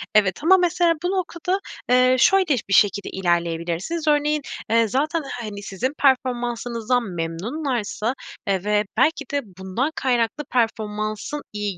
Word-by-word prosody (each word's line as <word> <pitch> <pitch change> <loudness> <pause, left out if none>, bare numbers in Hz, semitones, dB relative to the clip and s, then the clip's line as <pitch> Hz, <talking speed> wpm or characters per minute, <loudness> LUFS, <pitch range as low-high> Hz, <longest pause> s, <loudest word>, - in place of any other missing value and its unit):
Evet 200 +1 +3
ama 380 +4 +7
mesela 350 -1 +3
bu 360 - 0
noktada, 370 0 -1 0.3
eee, 255 +1 +5
şöyle 385 +7 +5 0.2
bir 195 - +1
şekilde 205 0 +3
ilerleyebilirsiniz: 175 - -1
Örneğin, 300 0 +2 0.3
eee, 230 0 +4
zaten 305 - 0 0.2
hani 205 -3 -6
sizin 225 +8 -3
performansınızdan 245 -2 +1
memnunlarsa, 215 - -2 0.3
eee, 190 -2 0
ve 210 0 +1
belki 300 +3 +2
de 285 0 0 0.2
bundan 190 +10 -2
kaynaklı 245 +2 0
performansın 215 +3 -1
iyi 205 -3 -3
240 Hz, 125 wpm, -23 LUFS, 205-295 Hz, 0.3 s, ama